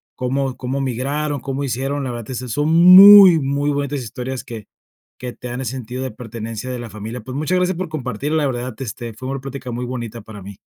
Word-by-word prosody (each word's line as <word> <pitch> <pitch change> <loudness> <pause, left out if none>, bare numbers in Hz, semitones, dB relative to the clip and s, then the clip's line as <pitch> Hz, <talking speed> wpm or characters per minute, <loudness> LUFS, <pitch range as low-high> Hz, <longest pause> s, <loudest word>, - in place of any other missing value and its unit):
cómo 130 +1 -2
cómo 130 +2 -4
migraron, 140 +3 -2
cómo 135 +1 -4
hicieron, 135 +2 -2
la 125 - -3
verdad, 120 -2 -7
que - - -7
eso 125 +1 -5
son 145 +6 -1
muy, 185 +2 +9
muy 140 +1 -1
bonitas 145 0 -2
historias 125 +2 -6
que 110 -3 -9 0.5
que 125 -1 -6
te 125 - -9
dan 125 +1 -5
el - - -5
sentido 125 +1 -5
de 130 - -4
pertenencia 115 0 -7
de 125 - -4
la 120 -1 -7
familia. 110 +4 -7
Pues, 130 +4 -8
muchas 155 +6 0
gracias 180 0 0
por 180 0 -4
compartir, 140 -2 -4
la 155 -2 +1
verdad, 125 -2 -3
este, 120 -2 -6
fue 130 +4 -8
una 135 0 -3
plática 135 -1 -7
muy 120 +1 -4
bonita 120 -2 -6
para 105 -1 -11
mí. 100 0 -10
130 Hz, 225 wpm, -19 LUFS, 120-145 Hz, 0.5 s, muy